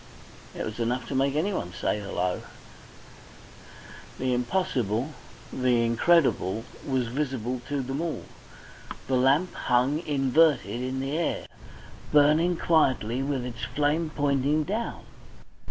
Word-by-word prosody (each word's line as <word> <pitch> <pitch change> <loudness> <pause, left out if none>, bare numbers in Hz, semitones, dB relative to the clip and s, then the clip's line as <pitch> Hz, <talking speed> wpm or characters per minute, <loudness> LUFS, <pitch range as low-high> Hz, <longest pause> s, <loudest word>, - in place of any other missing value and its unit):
It - - -2
was 110 +1 -6
enough 120 +2 -1
to - - -3
make 135 +1 +1
anyone 155 - -1
say 105 - 0
"Hullo!" 90 -3 -2 1.8
The 130 -1 0
impossible, 125 - 0 0.4
the 125 -2 +2
incredible, 115 - +2 0.2
was 130 -3 0
visible 130 -1 -2
to 140 -2 -1
them 135 +4 -3
all. 170 -2 -3 0.8
The 130 - +1
lamp 140 +8 +3
hung 130 +5 +1
inverted 140 - +2
in 130 +1 -2
the 135 +2 -2
air, 170 0 -1 0.7
burning 155 +4 +4
quietly 130 -8 +2
with 135 -2 -2
its 120 -2 -7
flame 150 +5 0
pointing 145 0 +1
down. 215 +9 -3
135 Hz, 120 wpm, -27 LUFS, 120-150 Hz, 1.8 s, burning